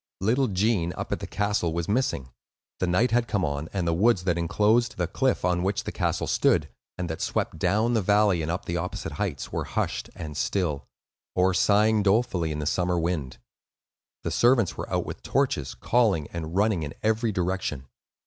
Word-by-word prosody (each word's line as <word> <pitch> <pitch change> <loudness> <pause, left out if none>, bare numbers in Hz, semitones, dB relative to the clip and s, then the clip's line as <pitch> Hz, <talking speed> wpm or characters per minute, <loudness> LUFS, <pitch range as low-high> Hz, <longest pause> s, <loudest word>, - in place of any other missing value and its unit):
Little 125 +7 +2
Gene, 95 -3 +1
up - - -5
at - - -1
the - - -6
castle, 100 -5 0
was 85 0 -2
missing. 105 - -1 0.5
The 90 - 0
night 110 +8 +2
had 120 0 +2
come 100 -4 0
on, 70 +2 -3
and 90 -4 -2
the 85 - +2
woods 95 +1 +3
that 90 -2 +1
inclosed 105 +8 +2
the 90 - +1
cliff 130 +4 0
on 90 -1 +1
which 95 +2 -1
the - - -4
castle - - -1
stood, - - +2 0.3
and 90 -1 -3
that 80 -1 -5
swept - - -2
down 110 +4 +2
the 110 - +2
valley 100 -2 +3
and 80 - -3
up 85 +3 -3
the 85 - -2
opposite 90 +2 -4
heights, 95 -10 -3
were - - -2
hushed - - -2
and 75 -3 -7
still, 75 -4 -1 0.5
or 90 +1 +3
sighing 105 +3 +3
dolefully 100 -5 +1
in 75 - -3
the 75 - -3
summer 90 +3 +1
wind. 80 -6 -2 0.9
The - - -2
servants 120 -5 +3
were - - -6
out - - 0
with - - -7
torches, - - 0
calling, 105 -11 +2
and 85 0 -5
running 105 -3 +2
in 75 0 -5
every 110 +1 +1
direction. 90 -7 -2
95 Hz, 195 wpm, -26 LUFS, 85-110 Hz, 0.9 s, woods